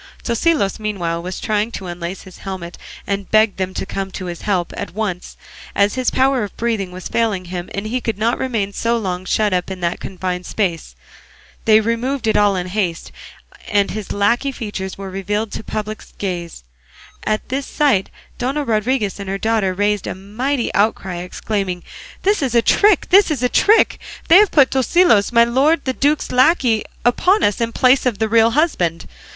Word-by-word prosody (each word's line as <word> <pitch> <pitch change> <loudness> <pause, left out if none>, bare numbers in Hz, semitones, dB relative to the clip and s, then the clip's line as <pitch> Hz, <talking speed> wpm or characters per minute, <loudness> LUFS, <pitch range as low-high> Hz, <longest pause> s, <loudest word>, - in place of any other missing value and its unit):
Tosilos 235 - +1
meanwhile 175 -6 -2
was 180 +1 -5
trying 215 +1 0
to 190 - -6
unlace 175 +1 -6
his 185 -2 -14
helmet, 185 -3 -6 0.3
and 200 -1 -1
he 195 - -14
begged 215 -1 +3
them 185 0 -2
to - - -3
come 195 0 -4
to 185 - -5
his 175 -1 -6
help 185 -4 -1
at - - -6
once, 200 -5 -4 0.4
as 200 0 +3
his 255 -1 0
power 265 -2 +2
of 205 - -7
breathing 220 -5 -1
was 185 0 -7
failing 215 -6 0
him, 175 0 -6
and 200 +1 -4
he 245 +4 -2
could 225 -4 -2
not 230 +3 0
remain 220 -6 -2
so 235 +3 0
long 185 -4 -3
shut 210 +1 +1
up 180 0 -1
in 190 -1 -6
that 170 0 -1
confined 180 -1 -4
space. 180 -6 -2 0.7
They 220 -1 +6
removed 235 +4 -1
it 220 - +2
in - - +5
all 205 -1 +3
haste, 180 -1 -2 0.6
and 200 -1 +1
his 215 -1 -5
lacquey 235 +7 +1
features 205 -6 -5
were 195 -1 -7
revealed 205 +3 -2
to - - -6
public 215 0 -5
gaze. 175 - -5 0.6
At 215 0 -2
this 270 +2 -2
sight 270 -11 +1 0.3
Dona 270 +4 -1
Rodriguez 220 -3 0
and 195 -1 -6
her 195 - -1
daughter 220 -2 +1
raised 205 +2 0
a - - -4
mighty 235 +7 -2
outcry, 195 -3 0
exclaiming, 180 0 -3 0.4
"This 405 -1 +2
is 255 -4 -1
a 235 - +4
trick! 410 - +4
This 395 +1 +6
is 280 -6 -2
a 250 - +3
trick! 435 - +4 0.3
They 335 - +9
have 415 -1 +6
put 280 -4 +4
Tosilos, 265 - +3
my 235 -1 +6
lord 275 +6 +2
the 260 - 0
duke's 290 +3 0
lacquey, 255 -4 +3 0.2
upon 365 - +3
us 205 +3 +1
in 230 0 0
place 255 +2 +3
of 235 -5 0
the 220 +1 0
real 225 +1 +4
husband. 175 - +1
215 Hz, 190 wpm, -19 LUFS, 190-245 Hz, 0.7 s, They